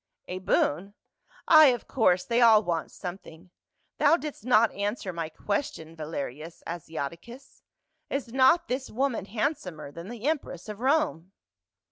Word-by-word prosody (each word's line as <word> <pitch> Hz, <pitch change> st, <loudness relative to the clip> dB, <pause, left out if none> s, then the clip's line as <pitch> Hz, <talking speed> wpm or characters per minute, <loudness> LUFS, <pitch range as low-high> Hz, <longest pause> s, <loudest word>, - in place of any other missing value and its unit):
"A 185 Hz, -, -5 dB
boon? 190 Hz, +1 st, 0 dB, 0.5 s
Ay, 310 Hz, -2 st, +9 dB
of 245 Hz, -2 st, 0 dB
course, 180 Hz, -7 st, +2 dB
they 235 Hz, 0 st, +1 dB
all 220 Hz, -2 st, +7 dB
want 170 Hz, -3 st, -2 dB
something. 180 Hz, -1 st, -9 dB, 0.5 s
Thou 310 Hz, +4 st, +5 dB
didst 300 Hz, -9 st, -7 dB
not 230 Hz, -2 st, +4 dB
answer 200 Hz, -1 st, -3 dB
my 165 Hz, -2 st, -4 dB
question, 165 Hz, -, -4 dB
Valerius 155 Hz, 0 st, -6 dB
Asiati 165 Hz, -1 st, -5 dB
cus. 245 Hz, +3 st, -14 dB, 0.5 s
Is 260 Hz, -4 st, -4 dB
not 270 Hz, +6 st, +4 dB
this 260 Hz, +1 st, -3 dB
woman 260 Hz, -3 st, -1 dB
handsomer 210 Hz, -, -3 dB
than 170 Hz, +6 st, -9 dB
the 240 Hz, +2 st, -5 dB
empress 285 Hz, -, -2 dB
of 210 Hz, -1 st, -7 dB
Rome 255 Hz, -, 0 dB
205 Hz, 140 wpm, -27 LUFS, 170-260 Hz, 0.5 s, Ay